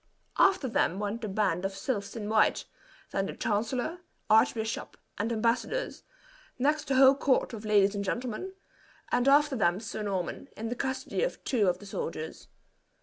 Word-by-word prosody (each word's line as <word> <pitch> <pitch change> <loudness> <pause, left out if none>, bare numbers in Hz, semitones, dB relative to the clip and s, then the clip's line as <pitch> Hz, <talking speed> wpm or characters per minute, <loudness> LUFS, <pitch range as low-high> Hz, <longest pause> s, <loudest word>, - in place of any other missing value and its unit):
After 380 -8 +4
them 190 -6 +1
went 210 +3 -3
the 220 - -3
band 195 -3 0
of 195 0 -2
sylphs 200 -1 -3
in 215 -3 -4
white, 215 0 +3 0.5
then 195 0 -1
the - - -5
chancellor, 240 +10 -1 0.3
archbishop, 220 0 +2 0.2
and 220 +3 -1
embassadors; 235 - -1 0.6
next 295 +4 +1
the 270 - +1
whole 265 0 +8
court 270 -2 +1
of 220 -1 -7
ladies 205 -1 +4
and 200 -1 -2
gentlemen; 245 - -3 0.6
and 245 +2 +2
after 290 0 +5
them 180 -5 +2
Sir 215 0 -5
Norman, 190 -4 -3
in 225 +1 -4
the 245 - -2
custody 265 +1 -2
of - - -2
two 225 -7 +1
of 175 - 0
the 205 - -13
soldiers. 160 -5 -5
220 Hz, 165 wpm, -29 LUFS, 200-260 Hz, 0.6 s, whole